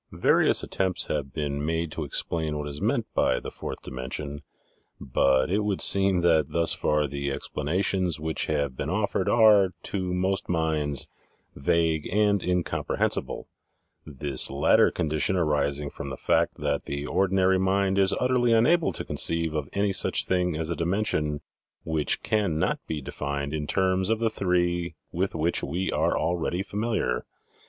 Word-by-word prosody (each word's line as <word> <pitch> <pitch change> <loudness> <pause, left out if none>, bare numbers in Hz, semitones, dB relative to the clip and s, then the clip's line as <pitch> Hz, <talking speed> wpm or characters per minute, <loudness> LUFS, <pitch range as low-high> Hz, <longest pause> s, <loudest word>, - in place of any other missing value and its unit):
Various - - +3
attempts 95 -2 0
have 70 -3 -2
been 75 -1 -3
made 80 +1 -1
to 80 - -4
explain 75 +2 -1
what 75 0 -4
is 75 0 -7
meant - - 0
by - - +2
"the - - -7
fourth - - -7
dimension," 70 +3 -5 0.6
but 65 +3 +2
it 100 - +2
would 105 -2 -1
seem 95 -2 +4
that 80 -4 +3
thus 85 0 +2
far 75 0 +1
the 70 0 -3
explanations 85 +5 -1
which 80 +1 -2
have 70 -3 -1
been - - -4
offered - - 0
are, 105 -5 +5
to 95 -2 -3
most 95 +2 -1
minds, 80 -4 0 0.5
vague 80 +2 0
and 105 0 +2
incomprehensible, 90 -1 -1 0.6
this 70 -2 0
latter 70 +1 +4
condi 80 0 -2
tion 95 - +2
arising 75 -4 0
from 70 - -7
the 65 - -6
fact - - +1
that 70 -1 -2
the 70 +1 -4
ordinary 95 +2 +2
mind 95 +1 +1
is 95 -1 +3
utterly 125 -2 +2
unable 155 +9 +3
to - - -3
conceive 85 -1 0
of 75 -3 -3
any 100 0 +1
such - - +1
thing 90 -2 0
as 80 +1 -2
a - - -1
dimension 85 -5 -1 0.4
which 80 -2 -1
cannot 100 -8 0
be 75 -2 -3
defined 70 +2 -4
in 75 -1 -3
terms 95 +1 +1
of 115 - +2
the 115 -1 +1
three 90 -3 0 0.2
with 95 +2 -2
which 80 +2 0
we 90 +7 -2
are - - +1
already 85 +2 -1
familiar. 105 - -2
85 Hz, 160 wpm, -26 LUFS, 75-95 Hz, 0.6 s, are